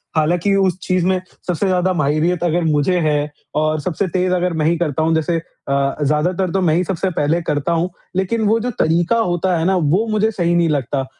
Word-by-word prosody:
हालाँकि 175 Hz, +5 st, +1 dB
उस 190 Hz, -2 st, +2 dB
चीज़ 185 Hz, -1 st, 0 dB
में 185 Hz, 0 st, +2 dB, 0.3 s
सबसे 180 Hz, +2 st, 0 dB
ज़्यादा 185 Hz, 0 st, +1 dB
माहिरियत 160 Hz, +3 st, 0 dB
अगर 175 Hz, 0 st, +1 dB
मुझे 155 Hz, +3 st, +1 dB
है 150 Hz, -2 st, 0 dB, 0.2 s
और 155 Hz, 0 st, +1 dB
सबसे 185 Hz, +3 st, -2 dB
तेज़ 185 Hz, +1 st, 0 dB
अगर 180 Hz, -1 st, 0 dB
मैं 155 Hz, -1 st, -1 dB
ही 170 Hz, +1 st, +2 dB
करता 155 Hz, -2 st, -1 dB
हूँ, 165 Hz, 0 st, +2 dB
जैसे 165 Hz, +1 st, 0 dB, 0.3 s
अ, 140 Hz, 0 st, +1 dB
ज़्यादातर 170 Hz, +6 st, 0 dB
तो 195 Hz, -, 0 dB
मैं 160 Hz, -3 st, +2 dB
ही 180 Hz, -, +2 dB
सबसे 190 Hz, +1 st, -2 dB
पहले 160 Hz, +4 st, +1 dB
करता 150 Hz, +2 st, 0 dB
हूँ। 170 Hz, +2 st, 0 dB, 0.3 s
लेकिन 190 Hz, +4 st, 0 dB
वो 225 Hz, +2 st, +3 dB
जो 245 Hz, -, -2 dB
तरीका 170 Hz, +8 st, +2 dB
होता 180 Hz, -3 st, 0 dB
है 160 Hz, -, -1 dB
ना 190 Hz, -, +2 dB
वो 175 Hz, +7 st, +1 dB
मुझे 215 Hz, +1 st, +1 dB
सही 175 Hz, -3 st, 0 dB
नहीं 170 Hz, -1 st, +2 dB
लगता, 135 Hz, -2 st, -1 dB
175 Hz, 215 wpm, -18 LUFS, 155-185 Hz, 0.3 s, वो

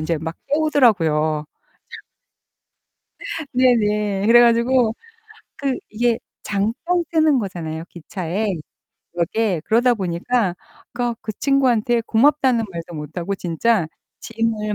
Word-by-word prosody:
이제 160 Hz, +1 st, -1 dB
막 160 Hz, +2 st, -5 dB
깨우더라고요. 190 Hz, -, +2 dB, 2.1 s
네네. 210 Hz, -5 st, +2 dB
그래 235 Hz, +2 st, +7 dB
가지고 235 Hz, 0 st, +3 dB, 0.6 s
그 270 Hz, -2 st, -2 dB
이게 235 Hz, +1 st, 0 dB, 0.2 s
잠깐 230 Hz, -, -1 dB
서는 315 Hz, -4 st, +3 dB
거잖아요, 165 Hz, -6 st, -5 dB
기차에, 180 Hz, +4 st, -4 dB, 0.7 s
역에. 180 Hz, +1 st, 0 dB
그러다 240 Hz, +2 st, +3 dB
보니까 190 Hz, +2 st, -1 dB, 0.4 s
그니까 240 Hz, -1 st, -1 dB
그 215 Hz, -, -5 dB
친구한테 245 Hz, -4 st, +2 dB
고맙다는 255 Hz, 0 st, +3 dB
말도 170 Hz, 0 st, -7 dB
못하고 170 Hz, +6 st, -4 dB
진짜 180 Hz, +2 st, 0 dB, 0.3 s
짐을 225 Hz, -2 st, -2 dB
220 Hz, 240 characters per minute, -21 LUFS, 175-245 Hz, 2.1 s, 그래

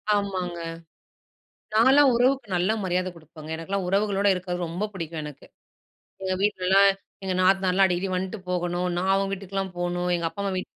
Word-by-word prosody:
ஆமாங்க. 185 Hz, -4 st, -2 dB, 1.1 s
நான்லாம் 265 Hz, +5 st, +6 dB
உறவுக்கு 255 Hz, 0 st, +2 dB
நல்ல 180 Hz, +4 st, +2 dB
மரியாதை 185 Hz, 0 st, 0 dB
குடுப்பேங்க 155 Hz, -1 st, -12 dB
எனக்கெல்லாம் 190 Hz, +4 st, -3 dB
உறவுகளோடு 200 Hz, 0 st, +2 dB
இருக்கறது 180 Hz, -1 st, -3 dB
ரொம்ப 180 Hz, +6 st, -3 dB
பிடிக்கும் 165 Hz, -3 st, -5 dB
எனக்கு. 150 Hz, -2 st, -10 dB, 0.8 s
எங்க 190 Hz, 0 st, -1 dB
வீட்லலாம் 195 Hz, -1 st, +4 dB, 0.3 s
எங்க 190 Hz, -1 st, -1 dB
நாத்தனார்லாம் 190 Hz, 0 st, +4 dB
அடிக்கடி 180 Hz, +1 st, -1 dB
வந்துட்டு 190 Hz, +3 st, -3 dB
போகணும். 175 Hz, 0 st, -1 dB
நான் 190 Hz, +2 st, +1 dB
அவங்க 195 Hz, 0 st, +1 dB
வீட்டுக்குலாம் 195 Hz, -1 st, -4 dB
போணும். 175 Hz, 0 st, -1 dB
எங்க 170 Hz, -1 st, -1 dB
அப்பா 200 Hz, -, -7 dB
அம்மா 195 Hz, -1 st, -1 dB
வீட்டுக்கு. 185 Hz, -, -7 dB
185 Hz, 150 wpm, -25 LUFS, 175-195 Hz, 1.1 s, நான்லாம்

